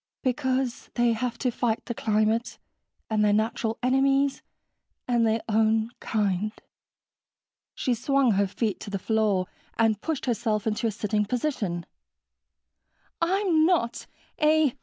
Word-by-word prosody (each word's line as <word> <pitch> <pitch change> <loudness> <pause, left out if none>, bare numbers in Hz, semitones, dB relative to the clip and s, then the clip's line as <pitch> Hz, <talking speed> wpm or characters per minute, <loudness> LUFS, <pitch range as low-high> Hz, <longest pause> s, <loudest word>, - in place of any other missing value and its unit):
"Because 260 -1 -1
they 240 -1 +3
have 235 +1 -2
to 250 -1 0
fight 230 -1 -1
the 235 - -3
climate... 220 +1 0 0.5
and 215 -1 +1
their 210 - +4
natural 220 +1 0
enemies... 270 +2 +2 0.7
and 240 -2 +3
their 220 +1 0
own 220 +1 +2
kind." 210 -1 0 1.2
She 255 - 0
swung 270 +1 +2
her 200 0 +2
feet 210 +1 -2
to - - -8
the 200 - -2
floor 210 -2 +1 0.3
and 220 -2 +2
pushed 320 -4 -2
herself 220 -3 0
into 220 +1 0
a - - 0
sitting 210 0 -1
position. 215 - -2 1.4
"I'm 355 -2 +2
not 320 -9 +1 0.3
a 305 -3 +4
230 Hz, 130 wpm, -26 LUFS, 215-260 Hz, 1.4 s, their